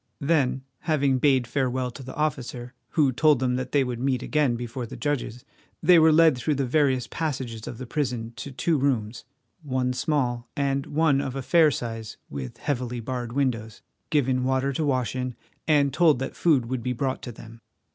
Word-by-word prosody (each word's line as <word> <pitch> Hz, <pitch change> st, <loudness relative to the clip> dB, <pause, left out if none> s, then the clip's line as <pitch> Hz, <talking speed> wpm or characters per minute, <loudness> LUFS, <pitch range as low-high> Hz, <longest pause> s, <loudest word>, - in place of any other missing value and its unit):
Then 140 Hz, -4 st, +1 dB, 0.3 s
having 140 Hz, -4 st, +2 dB
bade 130 Hz, -3 st, +3 dB
farewell 130 Hz, -1 st, -1 dB
to 135 Hz, -, -10 dB
the 130 Hz, 0 st, -8 dB
officer, 130 Hz, -4 st, -3 dB, 0.2 s
who 145 Hz, -5 st, +3 dB
told 150 Hz, +3 st, +4 dB
them 125 Hz, 0 st, 0 dB
that 130 Hz, 0 st, -4 dB
they 140 Hz, -2 st, +3 dB
would 125 Hz, -2 st, -4 dB
meet 130 Hz, -1 st, 0 dB
again 150 Hz, -5 st, +1 dB
before 120 Hz, +1 st, -5 dB
the -, -, -9 dB
judges, 140 Hz, -5 st, -3 dB, 0.4 s
they 175 Hz, +1 st, +7 dB
were 160 Hz, 0 st, +6 dB
led 160 Hz, -2 st, +6 dB
through 145 Hz, +5 st, -1 dB
the 140 Hz, 0 st, 0 dB
various 130 Hz, -2 st, +2 dB
passages 130 Hz, -8 st, -4 dB
of 115 Hz, -, -6 dB
the 130 Hz, -, -6 dB
prison 120 Hz, -4 st, -2 dB
to 140 Hz, -, -6 dB
two 155 Hz, +4 st, 0 dB
rooms, 120 Hz, -5 st, -1 dB, 0.4 s
one 130 Hz, -4 st, -1 dB
small 125 Hz, -4 st, -1 dB
and 140 Hz, -1 st, 0 dB
one 150 Hz, -2 st, +2 dB
of 135 Hz, -2 st, -4 dB
a 135 Hz, -, -3 dB
fair 165 Hz, +2 st, +5 dB
size 115 Hz, -5 st, -5 dB
with 65 Hz, -3 st, -6 dB
heavily 125 Hz, -3 st, -2 dB
barred 120 Hz, 0 st, -4 dB
windows, 115 Hz, -5 st, -2 dB, 0.3 s
given 130 Hz, -4 st, +1 dB
water 130 Hz, +1 st, +1 dB
to 155 Hz, -, -1 dB
wash 130 Hz, -4 st, 0 dB
in, 125 Hz, -1 st, -3 dB, 0.3 s
and 145 Hz, -3 st, +3 dB
told 165 Hz, -4 st, +4 dB
that 135 Hz, +2 st, -4 dB
food 145 Hz, -8 st, +3 dB
would 125 Hz, +1 st, -3 dB
be 125 Hz, +2 st, -1 dB
brought 130 Hz, +1 st, -2 dB
to 125 Hz, -, -6 dB
them. 115 Hz, 0 st, -13 dB
130 Hz, 190 wpm, -25 LUFS, 120-145 Hz, 0.4 s, they